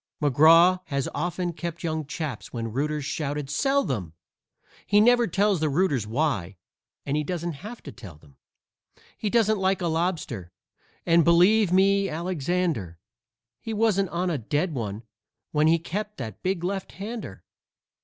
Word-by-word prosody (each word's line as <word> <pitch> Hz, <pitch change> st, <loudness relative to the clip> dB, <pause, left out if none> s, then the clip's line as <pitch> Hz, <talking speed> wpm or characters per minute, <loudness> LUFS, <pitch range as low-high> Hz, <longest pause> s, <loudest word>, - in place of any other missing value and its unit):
McGraw 165 Hz, +6 st, +6 dB
has 140 Hz, -4 st, -2 dB
often 175 Hz, 0 st, -2 dB
kept 170 Hz, 0 st, -6 dB
young 160 Hz, -3 st, -2 dB
chaps 150 Hz, -6 st, -5 dB
when 115 Hz, -2 st, -4 dB
rooters 150 Hz, +2 st, -1 dB
shouted 145 Hz, -1 st, -3 dB
"Sell 275 Hz, -, +2 dB
them!" 95 Hz, -, -3 dB, 0.7 s
He 205 Hz, -, +4 dB
never 240 Hz, +2 st, +5 dB
tells 195 Hz, +1 st, +1 dB
the 155 Hz, -1 st, +1 dB
rooters 140 Hz, -, +1 dB
why, 110 Hz, -, -1 dB, 0.5 s
and 150 Hz, +2 st, 0 dB
doesn't 170 Hz, +2 st, -3 dB
have 225 Hz, +4 st, -9 dB
to -, -, -8 dB
tell 105 Hz, -8 st, -11 dB
them. 75 Hz, -3 st, -21 dB, 0.8 s
He 210 Hz, -, -3 dB
doesn't 220 Hz, -2 st, +2 dB
like 190 Hz, 0 st, +1 dB
a 180 Hz, -, -2 dB
lobster, 160 Hz, -, -2 dB, 0.5 s
and, 170 Hz, 0 st, +5 dB
believe 180 Hz, +5 st, +4 dB
me, 195 Hz, +1 st, +3 dB
Alexander, 165 Hz, -, -2 dB, 0.6 s
He 225 Hz, -, -5 dB
wasn't 205 Hz, -4 st, +2 dB
on 175 Hz, +1 st, -1 dB
a 150 Hz, -, -1 dB
dead 150 Hz, -, -1 dB
one 110 Hz, -4 st, -4 dB, 0.5 s
when 150 Hz, +1 st, +3 dB
he 165 Hz, +1 st, +5 dB
kept 205 Hz, +6 st, -5 dB
that 110 Hz, -6 st, -7 dB
big 185 Hz, -2 st, -1 dB
left 195 Hz, +1 st, -3 dB
hander. 220 Hz, +4 st, -7 dB
165 Hz, 150 wpm, -25 LUFS, 140-190 Hz, 0.8 s, McGraw